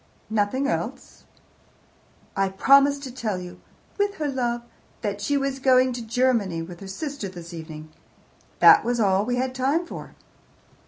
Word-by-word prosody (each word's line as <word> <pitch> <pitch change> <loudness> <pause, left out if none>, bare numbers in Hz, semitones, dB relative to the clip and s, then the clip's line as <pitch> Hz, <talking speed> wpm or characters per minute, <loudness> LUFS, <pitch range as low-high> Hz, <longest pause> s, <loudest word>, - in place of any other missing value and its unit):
"Nothing 220 +6 +1
else?" - - -4 1.1
"I 195 0 +1
promised 275 +7 +4
to 260 - -6
tell 220 -6 -2
you, 180 0 -9 0.4
'with 405 0 +1
her 305 -4 -2
love,' 240 -3 -1 0.4
that 205 -2 -3
she 285 +7 +1
was 275 -1 -2
going 255 -1 +4
to 240 - -5
Germany 225 -7 0
with 175 0 -10
her 195 - -9
sister 275 +1 -5
this 175 -2 -10
evening. 155 -1 -8 0.7
That - - +8
was 240 0 -1
all 195 -2 +3
we 245 +1 0
had 255 +1 -1
time 275 +7 0
for." - - -9
240 Hz, 155 wpm, -24 LUFS, 195-270 Hz, 1.1 s, That